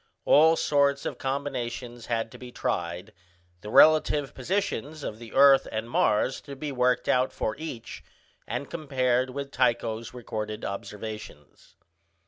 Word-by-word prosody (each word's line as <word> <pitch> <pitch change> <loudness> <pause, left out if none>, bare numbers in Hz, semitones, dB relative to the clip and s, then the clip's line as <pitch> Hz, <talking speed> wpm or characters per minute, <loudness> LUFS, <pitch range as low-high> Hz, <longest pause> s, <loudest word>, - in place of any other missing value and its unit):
All 160 +2 +6
sorts 140 -2 +2
of - - -4
combinations 125 -3 -4
had 115 -1 -1
to - - -12
be 125 -1 -9
tried, 90 +1 -3 0.5
the 105 - -8
relative 150 +1 +5
positions 155 - -2
of 110 - -5
the 115 -2 -10
earth 135 0 +6
and 110 +1 -3
Mars 120 +2 +1
to 140 - -9
be 145 +2 -5
worked 125 -1 +1
out 130 +1 +2
for 110 - -2
each, 145 -7 -7 0.4
and 125 +5 -3
compared 130 -5 0
with 140 +1 -6
Tycho's 115 -3 0
recorded 110 -3 -5
observations. 105 -6 -8
125 Hz, 135 wpm, -27 LUFS, 110-140 Hz, 0.5 s, All